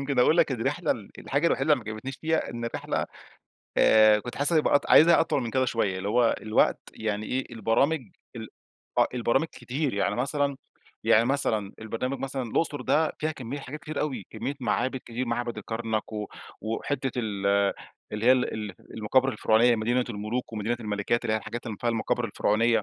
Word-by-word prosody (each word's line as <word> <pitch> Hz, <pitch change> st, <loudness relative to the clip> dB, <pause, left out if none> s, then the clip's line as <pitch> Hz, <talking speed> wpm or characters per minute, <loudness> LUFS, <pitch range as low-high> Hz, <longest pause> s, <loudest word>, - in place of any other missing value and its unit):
يمكن 140 Hz, -1 st, -2 dB
أقول 155 Hz, +7 st, +5 dB
لك 140 Hz, -, +3 dB
الرحلة 115 Hz, -3 st, -1 dB
ال -, -, -3 dB
الحاجة 145 Hz, +5 st, 0 dB
الوحيدة 140 Hz, 0 st, +2 dB
اللي 130 Hz, -6 st, +1 dB
ما 110 Hz, -, -5 dB
عجبتنيش 125 Hz, +5 st, -6 dB
فيها، 160 Hz, 0 st, -1 dB
إن 120 Hz, 0 st, -5 dB
الرحلة 115 Hz, -, -2 dB, 0.7 s
آآ 110 Hz, -1 st, +6 dB
كُنت 120 Hz, -, -7 dB
حاسس 145 Hz, +4 st, +2 dB
هتبقى 155 Hz, -2 st, +3 dB
أط 145 Hz, -, +2 dB
عايزها 170 Hz, +2 st, +7 dB
أطول 145 Hz, -4 st, +1 dB
من 115 Hz, -, -3 dB
كده 130 Hz, +2 st, +2 dB
شوية، 105 Hz, -6 st, 0 dB
اللي 95 Hz, +2 st, -3 dB
هو 120 Hz, +2 st, +3 dB
الوقت 110 Hz, 0 st, +2 dB
يعني 110 Hz, -1 st, -3 dB
إيه، 130 Hz, +1 st, -1 dB
البرامج 120 Hz, +8 st, +1 dB, 0.4 s
ال -, -, -7 dB, 0.5 s
آه، -, -, +6 dB
البرامج 125 Hz, +5 st, +1 dB
كتير 135 Hz, 0 st, -3 dB
يعني 100 Hz, 0 st, 0 dB
مثلًا 140 Hz, +2 st, 0 dB, 0.5 s
يعني 115 Hz, -, +5 dB
مثلًا 110 Hz, -6 st, 0 dB
البرنامج 115 Hz, +5 st, -3 dB
مثلًا 135 Hz, 0 st, -3 dB
الأُقْصُر 145 Hz, +5 st, -1 dB
ده 155 Hz, +1 st, +2 dB
فيها 155 Hz, +1 st, -1 dB
كمية 135 Hz, -1 st, -6 dB
حاجات 150 Hz, +3 st, -8 dB
كتيرة 155 Hz, -1 st, -4 dB
أوي، 130 Hz, -11 st, -3 dB
كمية 140 Hz, -, -4 dB
معابد، 130 Hz, +3 st, 0 dB
كتير 120 Hz, +2 st, -4 dB
معبد 120 Hz, -1 st, -2 dB
الكرنك 110 Hz, 0 st, -3 dB
و 105 Hz, -1 st, -3 dB, 0.3 s
وحتّة 130 Hz, +5 st, -2 dB
ال 100 Hz, -4 st, -2 dB, 0.7 s
اللي 105 Hz, +2 st, -2 dB
هي 130 Hz, -, +8 dB
ال 130 Hz, -1 st, +1 dB
ال 105 Hz, -3 st, -5 dB, 0.2 s
المقابر 130 Hz, +5 st, +2 dB
الفرعونية 115 Hz, +2 st, +3 dB
مدينة 120 Hz, +3 st, +1 dB
المُلوك 110 Hz, +3 st, -4 dB
ومدينة 110 Hz, +2 st, -1 dB
الملِكات، 105 Hz, +3 st, -1 dB
اللي 110 Hz, -2 st, +1 dB
هي -, -, +2 dB
الحاجات 120 Hz, +3 st, -7 dB
اللي 110 Hz, -3 st, -4 dB
فيها 120 Hz, -, 0 dB
المقابر 115 Hz, +1 st, -1 dB
الفرعونية 115 Hz, +1 st, +2 dB
120 Hz, 185 wpm, -27 LUFS, 110-135 Hz, 0.7 s, هي